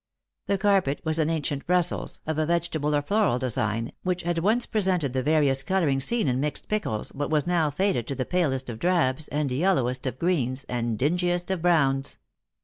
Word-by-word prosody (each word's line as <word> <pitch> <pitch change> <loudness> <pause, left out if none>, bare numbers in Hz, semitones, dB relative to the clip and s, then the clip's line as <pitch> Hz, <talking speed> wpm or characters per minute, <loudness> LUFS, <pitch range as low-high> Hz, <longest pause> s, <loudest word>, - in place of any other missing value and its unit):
The 200 - +1
carpet 190 -8 +2
was 160 0 0
an 155 0 +2
ancient 145 -3 -2
Brussels, 180 -1 0
of 155 0 -2
a 155 - +2
vegetable 165 -3 0
or 145 - +1
floral 200 - +2
design, 115 -3 -2
which 180 -1 -2
had 170 0 0
once 220 +7 +2
pre 215 - -1
sented 180 -9 0
the 130 - 0
various 145 -1 +2
colouring 155 -4 +1
seen 225 - 0
in 125 0 +1
mixed 150 +1 -2
pickles, 205 - -2
but 145 +1 -3
was 150 -2 +1
now 170 -3 +2
faded 165 - 0
to 140 - -3
the 130 - -2
palest 140 -8 0
of 110 - -8
drabs, 155 -5 +1
and 145 -2 -1
yellowest 130 -4 +1
of 130 - -4
greens, 135 -6 0
and 120 -2 -2
dingiest 175 - 0
of 185 -3 -1
browns. 140 -6 +2
155 Hz, 195 wpm, -26 LUFS, 135-180 Hz, -, carpet